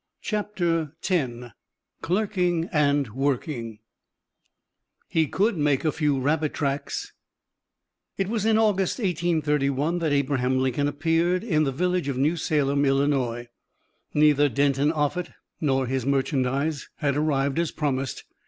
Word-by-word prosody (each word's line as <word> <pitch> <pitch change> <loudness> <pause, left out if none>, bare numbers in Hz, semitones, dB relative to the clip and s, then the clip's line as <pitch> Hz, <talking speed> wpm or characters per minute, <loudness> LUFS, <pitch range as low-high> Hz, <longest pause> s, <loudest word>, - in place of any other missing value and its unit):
CHAPTER 175 -8 -1
X 165 -10 +1 0.7
CLERKING 180 -3 0
AND 145 -4 +2
WORKING 125 -2 -2 1.3
HE 160 -1 +2
COULD 205 +4 +1
"MAKE 145 0 +1
A 155 - +3
FEW 150 -4 0
RABBIT 150 +3 0
TRACKS" 140 -1 -3 1.0
It 195 - 0
was 220 -1 -1
in 220 0 +3
August, 205 -4 +2
1831, 160 - 0
that 160 -3 0
Abraham 130 -2 +1
Lincoln 130 +2 +1
appeared 165 +5 +1
in 155 -9 +1
the 135 - 0
village 180 +3 0
of 135 -3 -2
New 150 +6 +2
Salem, 145 -3 +1
Illinois. 135 -4 +1 0.7
Neither 150 -1 +4
Denton 140 +3 +2
Offutt 160 +3 -2 0.3
nor 135 -3 +1
his 130 0 -2
merchandise 140 +2 0
had 140 -3 -1
arrived 140 -1 +1
as 170 -2 0
promised. 135 -3 -2
145 Hz, 125 wpm, -25 LUFS, 135-170 Hz, 1.3 s, Neither